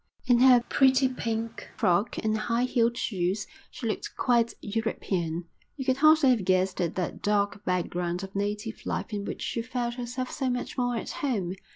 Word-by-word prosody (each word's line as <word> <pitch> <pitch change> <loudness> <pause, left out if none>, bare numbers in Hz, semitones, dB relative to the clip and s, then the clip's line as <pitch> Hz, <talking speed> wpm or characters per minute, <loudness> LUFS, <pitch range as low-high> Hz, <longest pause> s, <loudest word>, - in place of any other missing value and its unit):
In 245 -1 +4
her 250 -2 +7
pretty 265 0 +4
pink 230 -2 -4
frock 180 +5 +2
and 215 0 +1
high 230 +2 0
heeled 235 -2 +1
shoes 190 -1 -1 0.2
she 255 - -8
looked 220 - -3
quite 235 -2 +2
European. 185 -6 -2 0.3
You 265 - -4
could 260 -1 +2
hardly 310 -2 +6
have 230 -6 +1
guessed 185 0 +1
at 170 -2 -1
that 180 -2 -3
dark 205 0 0
background 180 0 -1
of 195 0 -8
native 210 +2 -3
life - - -3
in 200 -1 -3
which - - -5
she 230 - -2
felt 245 0 -3
herself 250 +1 -4
so 265 -3 -1
much 245 0 -3
more 245 -2 0
at 230 - -4
home. 205 -11 -2
230 Hz, 180 wpm, -27 LUFS, 195-250 Hz, 0.3 s, her